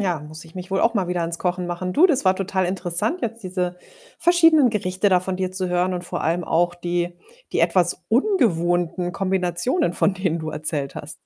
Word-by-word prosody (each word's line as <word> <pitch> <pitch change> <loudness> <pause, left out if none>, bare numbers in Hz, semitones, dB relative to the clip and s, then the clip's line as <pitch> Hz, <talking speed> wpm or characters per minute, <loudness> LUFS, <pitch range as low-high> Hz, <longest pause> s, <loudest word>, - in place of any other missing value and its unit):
Ja, 180 -6 -1
muss 155 +2 -10
ich 165 - -17
mich 185 0 -8
wohl 195 - +1
auch 230 - +2
mal 190 -5 0
wieder 180 -1 -1
an's 165 0 -3
Kochen 180 0 -2
machen. 175 +1 -3
Du, 335 - +6
das 280 - +1
war 185 0 +3
total 190 -1 -1
interessant, 180 - 0
jetzt 230 0 -4
diese 180 -1 -3 0.4
verschiedenen 330 -6 +5
Gerichte 190 -2 0
da 185 -2 +4
von 185 0 -3
dir 185 0 -2
zu 185 0 -2
hören 180 +1 +1
und 180 0 -4
vor 175 0 -4
allem 170 +2 0
auch 175 +2 +1
die 175 0 -2 0.4
die - - 0
etwas 180 0 +2
ungewohnten 175 - +1
Kombinationen, 190 - 0
von 190 +2 +1
denen 185 -3 -1
du 155 -1 -5
erzählt 150 -2 -3
hast. 155 +2 -6
180 Hz, 210 wpm, -22 LUFS, 175-195 Hz, 0.4 s, Du